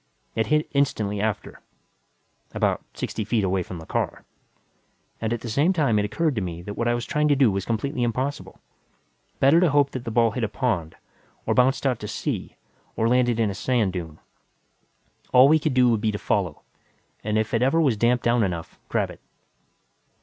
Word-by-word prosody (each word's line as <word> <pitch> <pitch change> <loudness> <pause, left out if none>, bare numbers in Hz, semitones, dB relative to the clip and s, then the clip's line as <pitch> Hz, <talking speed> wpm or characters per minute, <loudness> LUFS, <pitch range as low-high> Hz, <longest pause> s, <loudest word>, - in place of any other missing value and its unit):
It 110 -1 0
hit 150 +3 +2
instantly 105 -8 0
after 110 -1 -3 0.9
about - - +1
sixty 110 - -3
feet 110 -1 0 0.2
from 90 - -6
the 80 - -10
car. - - -3 1.0
And 110 0 -1
at 120 -1 -2
the 120 - -6
same 145 - +2
time, 140 - +2
it 105 - 0
occurred 155 +8 0
to 110 - -2
me 85 -2 -5
that 105 - -6
what 120 +3 -2
I 120 - +2
was 120 - -3
trying 150 0 +1
to 145 - +4
do 130 -5 +4
was 95 0 -2
completely 125 +4 -2
impossible. 130 +4 -2 0.8
Better 140 +5 +5
to 180 -1 +4
hope 145 -1 +3
that 130 - -5
the 115 - -4
ball 115 0 +3
hit 120 +2 -3
a - - +2
pond, 95 -11 -2 0.5
or - - +1
bounced 130 +3 +2
out 125 -4 +1
to 105 - -6
sea, - - -4 0.4
or 110 - +1
landed 120 -1 +2
in 110 -3 +2
a - - -4
sand 110 -3 0
dune. 80 -4 -6 1.2
All 130 +1 +8
we 155 +2 +5
could 150 -3 -1
do 125 -1 +5
would 115 -3 +1
be 110 - +1
to 105 - -3
follow, 95 -7 -1 0.6
and 110 0 0
if 110 0 -1
it 115 - +2
ever 135 +6 +3
was 140 -8 +3
damped 120 +3 +2
down 120 0 +3
enough, 85 -4 -4
grab - - 0
it. - - -13
115 Hz, 200 wpm, -24 LUFS, 105-135 Hz, 1.2 s, All